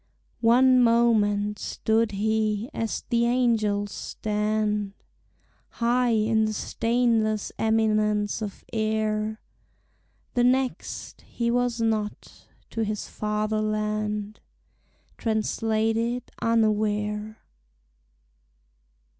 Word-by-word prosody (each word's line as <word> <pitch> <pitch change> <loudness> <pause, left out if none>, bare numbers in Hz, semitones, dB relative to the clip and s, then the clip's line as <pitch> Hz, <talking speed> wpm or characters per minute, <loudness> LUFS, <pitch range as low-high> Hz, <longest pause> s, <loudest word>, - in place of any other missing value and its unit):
One 250 +2 +5
moment 210 -3 +3
stood 220 -1 0
he 215 +3 0
as 225 -2 -3
the 235 0 +3
angels 215 -5 +1
stand, 210 -1 -2 0.8
High 245 +1 +1
in 220 0 +2
the 215 - -1
stainless 230 -2 0
eminence 215 -1 +1
of 205 -2 -6
air; 215 0 -1 0.9
The 245 - +2
next, 255 +1 -1
he 235 -1 -1
was 245 -1 0
not, 215 -2 -3 0.2
to 225 - -1
his 210 -1 -3
fatherland 215 0 -2 0.8
Translated 225 +2 0 0.2
unaware. 215 -1 0
220 Hz, 80 wpm, -26 LUFS, 210-230 Hz, 0.9 s, One